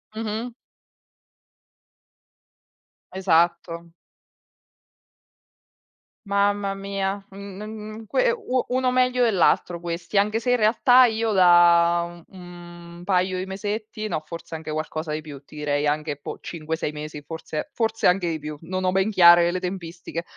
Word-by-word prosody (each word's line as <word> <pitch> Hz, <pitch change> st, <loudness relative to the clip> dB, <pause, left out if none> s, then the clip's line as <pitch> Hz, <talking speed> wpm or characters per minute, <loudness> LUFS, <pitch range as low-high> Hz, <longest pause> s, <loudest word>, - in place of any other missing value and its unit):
Mh-mh. 225 Hz, +2 st, -4 dB, 2.6 s
Esatto. 170 Hz, -2 st, 0 dB, 2.3 s
Mamma 200 Hz, 0 st, +1 dB
mia, 195 Hz, 0 st, -3 dB
un 195 Hz, 0 st, -9 dB
n 210 Hz, -, -7 dB
n 215 Hz, 0 st, -8 dB
n -, -, -15 dB
que -, -, +2 dB
u 260 Hz, -, -1 dB
uno 255 Hz, 0 st, +1 dB
meglio 250 Hz, 0 st, +2 dB
dell'altro 180 Hz, -5 st, +2 dB
questi, 170 Hz, +2 st, -4 dB
anche 210 Hz, +2 st, +2 dB
se 245 Hz, +2 st, -1 dB
in -, -, +5 dB
realtà 245 Hz, +3 st, +5 dB
io 225 Hz, -2 st, +1 dB
da, 175 Hz, -1 st, +4 dB
uhm, 175 Hz, -2 st, -12 dB
1 -, -, -11 dB
paio 185 Hz, 0 st, +1 dB
di 185 Hz, -, -3 dB
mesetti 215 Hz, +3 st, -5 dB
no, 155 Hz, -, -3 dB
forse 165 Hz, +1 st, -8 dB
anche 160 Hz, -1 st, -6 dB
qualcosa 155 Hz, 0 st, -4 dB
di 155 Hz, -, -2 dB
più, 145 Hz, -3 st, -11 dB
ti 150 Hz, -, -15 dB
direi 145 Hz, 0 st, -1 dB
anche 150 Hz, 0 st, -1 dB
poh 145 Hz, -, -8 dB
5-6 160 Hz, -2 st, -4 dB
mesi 150 Hz, 0 st, -7 dB
forse 155 Hz, 0 st, -6 dB
forse 225 Hz, -1 st, 0 dB
anche 180 Hz, -1 st, +2 dB
di 160 Hz, -1 st, -3 dB
più, 150 Hz, 0 st, -7 dB
non 185 Hz, +3 st, -4 dB
ho 185 Hz, -, +1 dB
ben 190 Hz, +2 st, +2 dB
chiare 175 Hz, -3 st, +7 dB
le 185 Hz, -, -2 dB
tempistiche; 175 Hz, -2 st, -6 dB
180 Hz, 140 wpm, -23 LUFS, 170-210 Hz, 2.6 s, chiare